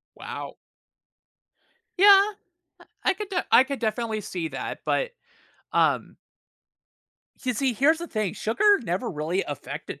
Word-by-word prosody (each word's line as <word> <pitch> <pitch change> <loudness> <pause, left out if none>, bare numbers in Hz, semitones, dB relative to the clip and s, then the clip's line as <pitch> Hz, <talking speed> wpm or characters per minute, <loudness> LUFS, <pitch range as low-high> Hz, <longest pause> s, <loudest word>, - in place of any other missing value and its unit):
Wow. - - -7 1.4
Yeah, 395 0 +8 0.6
I - - -17 0.2
I 380 - +4
could 415 +1 -6
de 380 -2 -1
I 255 - +7
could 275 0 -5
definitely 220 -1 -1
see 175 -5 -4
that, - - -5
but, - - 0 0.6
um - - +1 1.3
you 250 -1 0
see, 265 +2 +1
here's 290 +8 +3
the 340 - -5
thing, 215 - -2
sugar 410 - +3
never 200 +4 -2
really 165 +4 -1
affected 145 0 -7
240 Hz, 130 wpm, -25 LUFS, -, 1.4 s, Yeah